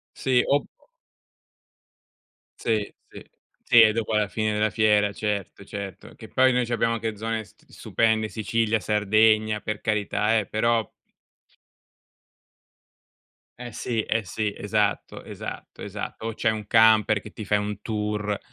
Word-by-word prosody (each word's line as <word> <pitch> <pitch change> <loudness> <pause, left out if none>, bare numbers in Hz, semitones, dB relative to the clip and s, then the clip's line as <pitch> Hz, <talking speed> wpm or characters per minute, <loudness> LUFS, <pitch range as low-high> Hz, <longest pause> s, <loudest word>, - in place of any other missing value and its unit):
Sì, 130 -2 +2
ob 140 0 +2 1.9
Sì, 110 -3 -1
sì. - - -12 0.4
Sì 120 - +7
e 110 -1 +6
dopo, 115 0 -2
alla 105 -1 +2
fine 110 +1 -1
della 105 +1 +1
fiera, 105 -1 +2
certo, 100 -2 -4
certo, 100 -2 -8
che - - -11
poi 130 0 +3
noi 125 -1 +1
c'abbiamo 115 -1 0
anche 110 -1 -3
zone 110 +1 -3
st - - -25
stupende, 110 -1 0
Sicilia, 110 +1 0
Sardegna, 110 +1 +2
per 105 -1 -4
carità 105 0 0
eh, 105 - 0
però 115 +2 0 2.7
Eh 120 -1 -7
sì, 115 -3 -2
eh 115 -1 -1
sì, 105 +1 -3
esatto, 105 0 -1
esatto, - - -8
esatto, - - -6
o 115 - -3
c'è 110 - 0
un 110 -1 -3
camper 110 -2 +5
che 105 - -11
ti 110 - -8
fai 105 +1 +2
un 105 0 -4
tour, 105 -1 -2
110 Hz, 140 wpm, -25 LUFS, 105-115 Hz, 2.7 s, Sì